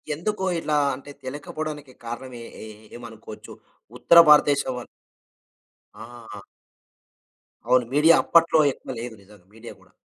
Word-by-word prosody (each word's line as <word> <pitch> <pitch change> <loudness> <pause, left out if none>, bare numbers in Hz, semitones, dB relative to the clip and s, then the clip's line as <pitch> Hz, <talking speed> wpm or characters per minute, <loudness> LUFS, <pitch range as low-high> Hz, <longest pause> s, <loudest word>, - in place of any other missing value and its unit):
ఎందుకు 190 +4 -4 0.2
ఇట్లా 150 -2 -1 0.2
అంటే, 140 +2 -12
తెలియకపోవడానికి 145 +1 -7
కారణం 125 +2 -7
ఏ - - -10 0.2
ఏ - - -9 0.3
ఏమనుకోవచ్చు? 110 -2 -12 0.4
ఉత్తర 170 - +6
భారతదేశం 145 -2 +4
వాళ్ళు 125 - -8 1.1
ఆ! 115 -2 -12 1.3
అవును. 125 -1 +3
మీడియా 160 +3 +5
అప్పట్లో 165 -1 +3
ఎక్కువ 130 - -10
లేదు 120 -1 -7
నిజంగా, 100 -2 -20
మీడియా 115 +1 -11
కూడా. - - -25
130 Hz, 120 wpm, -23 LUFS, 115-150 Hz, 1.3 s, ఉత్తర